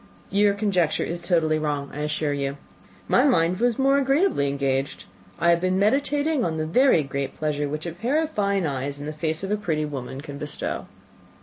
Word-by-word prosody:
"Your 200 0 +3
conjecture 190 -6 +1
is 170 +1 -4
totally 165 -3 +1
wrong, 145 -2 -2
I 150 - -6
assure 150 0 -1
you. 140 0 -2 0.5
My - - +4
mind 180 - +3
was 240 -1 +2
more 275 +1 +3
agreeably 275 - +2
engaged. 140 0 -1 0.3
I 170 +2 +3
have 170 0 +2
been 185 0 +1
meditating 285 +6 +1
on 160 -2 -1
the 155 - -1
very 170 - +4
great 140 0 -4
pleasure 150 -2 -1
which 150 +2 -4
a 170 - -3
pair 235 - 0
of 320 -1 -1
fine 200 - 0
eyes 140 0 -3
in 145 - -6
the 155 - -4
face 160 +2 -2
of 195 - -3
a 210 - +2
pretty 160 -7 -1
woman 135 -3 -6
can 140 0 -8
bestow." 150 0 -4
165 Hz, 200 wpm, -24 LUFS, 145-210 Hz, 0.5 s, My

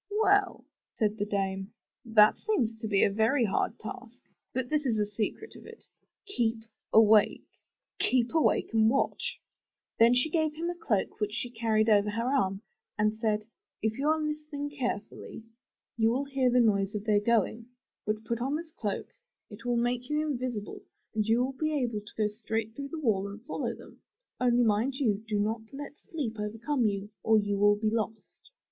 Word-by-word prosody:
Well,'' 405 -2 +2 0.3
said 215 -1 0
the 205 - -1
dame, 195 0 -2 0.3
*'that 215 -2 +6
seems 365 - 0
to 220 - -2
be 200 -2 +3
a - - +3
very 225 +5 +2
hard 195 - 0
task. - - -9 0.3
But 260 -1 -2
this 300 +2 0
is 240 -5 +1
the 210 - +2
secret 210 - -4
of - - -13
it 455 0 -13 0.2
— - - -62
keep 230 - -1 0.3
awake! 215 -1 +5 0.5
Keep 245 0 +2
awake 320 -7 +2
and 220 -1 +5
watch 270 +3 0
T' - - -42 0.6
Then 230 +2 +6
she 250 +5 +2
gave 315 -2 +1
him 340 +2 -2
a - - -7
cloak 225 - -1
which 210 -1 -1
she 245 +2 -3
carried 225 -2 +1
over 210 -1 +4
her 230 +3 -2
arm, 195 -6 0 0.3
and 215 0 +3
she 220 - -16
said, 215 -2 0 0.4
''If 220 +2 -1
you 285 - 0
are 315 +1 +3
listening 300 -1 -4
carefully, 240 -5 -5 0.5
you 225 -1 +4
will 260 +4 0
hear 270 -2 +1
the 250 +1 +4
noise 205 -3 +2
of 205 - -3
their 210 -2 +4
going. 230 +1 +1 0.4
Then 215 +1 -1
put 235 +1 -3
on 270 +4 0
this 320 0 -6
coat; 205 -9 -4 0.4
it 220 +3 -11
will 245 -1 +1
make 245 +2 -1
you 300 0 +1
invisible 250 -7 -4 0.3
and 215 -1 0
you 230 +2 +3
will 265 +1 -2
be 310 +3 -1
able 240 -6 -1
to 210 - -14
go 215 -1 +2
straight 220 +1 -3
through 280 +1 -6
the 325 - -5
wall 205 -8 +1
and 200 +2 -8
follow 295 - -3
them. - - -15 0.4
Only 245 -1 +3
mind 225 +4 +1
you, 220 -6 0
do 215 -1 0
not 215 +2 0
let 285 +1 -8
sleep 295 - -5
overcome 225 +4 0
you 200 0 -3
or 220 0 +4
you 205 -1 0
will 205 0 +5
be 215 +1 0
lost.'' 220 -1 -4
225 Hz, 195 wpm, -29 LUFS, 210-270 Hz, 0.6 s, that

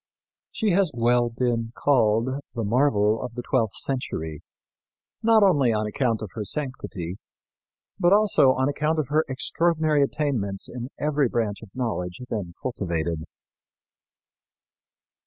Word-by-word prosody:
She 220 -3 0
has 185 0 +3
well 120 0 +3
been 115 -1 -1
called 130 0 +2
"the 115 - -2
marvel 110 -2 +2
of 125 -2 -6
the 120 - -4
twelfth 120 -6 0
century," 80 - -3 0.8
not 225 -1 +5
only 145 -11 +4
on 110 -1 0
account 115 0 -1
of 105 - -7
her 110 - -4
sanctity, 105 - -3 0.8
but 175 -1 +4
also 200 -10 +5
on 130 +1 0
account 150 +3 0
of 150 -4 -1
her 155 +2 +3
extraordinary 155 +2 +1
attainments 130 -9 -1
in 125 0 -6
every 150 -3 +1
branch 110 -4 -1
of 110 - -11
knowledge 90 -8 -3
then 90 -6 -4
cultivated. 85 -8 -2
120 Hz, 130 wpm, -25 LUFS, 105-145 Hz, 0.8 s, not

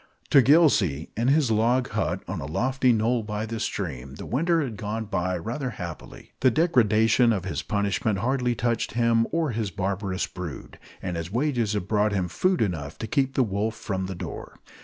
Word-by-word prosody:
To 140 - +8
Gillsey, 120 - +3
in 115 +3 0
his 140 -3 +3
log 120 +4 +2
hut - - -2
on - - -4
a 70 - -5
lofty 130 - +1
knoll 115 +1 +2
by 105 0 -4
the 115 0 -5
stream, 70 - -4
the - - -8
winter 165 +5 +1
had 120 -6 -5
gone 110 +2 -4
by 90 -3 -1
rather 120 - -3
happily. 85 -4 -8
The 130 - +5
degradation 120 - +3
of 95 -4 -1
his 80 -5 -2
punishment 100 +3 0
hardly 125 +2 0
touched 115 +1 -1
him 115 -1 +2
or 165 -4 0
his 110 -2 -2
barbarous 95 0 -2
brood; 90 -6 -8 0.2
and 90 -2 -3
his 85 +2 -5
wages 120 -3 0
had 100 -3 -2
brought 105 0 +2
him 90 -3 -1
food 185 - +1
enough 80 -8 -4
to - - -4
keep 135 +4 0
the 130 - +4
wolf 105 +1 -1
from 95 -4 -3
the 95 - -5
door. 85 -1 -7
110 Hz, 190 wpm, -25 LUFS, 95-125 Hz, 0.2 s, To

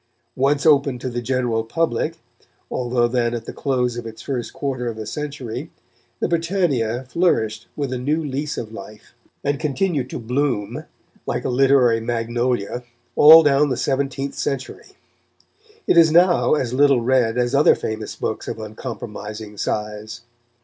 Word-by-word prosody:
Once 140 +3 +1
open 140 -4 +4
to 130 +1 -4
the 120 0 -3
general 120 -2 0
public, 120 +1 -1 0.5
although 120 -1 +1
then 120 -1 0
at 115 -1 -6
the - - -7
close 125 -3 -1
of 120 -1 -5
its 110 0 -10
first 125 -4 -3
quarter 130 -3 -3
of 115 -2 -4
a 110 - -5
century, 140 +1 -5 0.5
the - - 0
Britannia 165 - 0
flourished 115 -10 0
with 140 -3 -3
a 125 - -3
new 150 +5 0
lease 145 +1 -3
of 110 - -5
life, 105 0 -11 0.3
and 140 -1 0
continued 150 -3 -1
to - - -5
bloom, 125 -2 -2 0.4
like - - -2
a - - 0
literary 125 -2 +4
magnolia, 120 0 -1 0.3
all 160 +2 +9
down 145 0 +3
the 130 - -1
seventeenth 135 +1 -1
century. 135 -2 -5 0.9
It - - +3
Is 165 -2 +7
now 175 -1 +4
as 125 -5 -2
little 140 -2 +4
read 120 -1 +2
as 120 +1 0
other 140 +2 +5
famous 110 0 -5
books - - -4
of - - -4
uncompromising 110 -1 -7
size. 105 +2 -4
125 Hz, 155 wpm, -21 LUFS, 115-140 Hz, 0.9 s, all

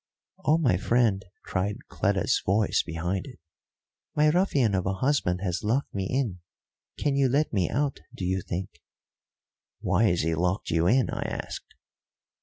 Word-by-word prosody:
"Oh, 155 -1 +4
my 125 - +2
friend," 110 -2 +2 0.2
cried 100 +2 -2
Cleta's - - +1
voice 100 +2 +2
behind 85 - -3
it, 130 - -11 0.8
"my 150 0 +5
ruffian 145 - +2
of 95 -1 0
a 95 - +1
husband 95 -6 +1
has 90 0 -2
locked 120 +7 0
me 95 -1 -2
in 125 -9 -1 0.6
can 145 -2 0
you 135 -2 +3
let 145 +2 +1
me 95 -4 +1
out, 140 +1 -1 0.2
do 95 - -4
you 95 +1 0
think?" 90 -4 -5 1.0
"Why 95 +4 +2
has 90 -5 +2
he 80 +1 0
locked 90 +4 -1
you 85 +1 +2
in?" 125 -1 +3
I - - -3
asked. - - -6
100 Hz, 160 wpm, -27 LUFS, 90-130 Hz, 1.0 s, my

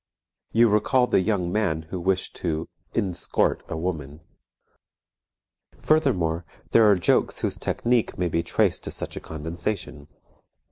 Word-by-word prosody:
You 115 +1 +5
recall 110 +4 +3
the 105 - +2
young 95 -3 0
man 80 -6 0
who 95 - -3
wished 95 +1 -1
to 80 -2 -2 0.3
inscort 95 -6 0
a - - -3
woman. 80 -3 -4 1.6
Furthermore, 90 - +1 0.3
there 110 -2 +6
are 100 - +6
jokes 90 - +1
whose - - 0
technique 120 -1 0
may 90 - 0
be 85 0 0
traced 85 - +1
to - - -4
such - - -4
a - - -4
condensation. 80 -1 -5
90 Hz, 135 wpm, -25 LUFS, 80-110 Hz, 1.6 s, there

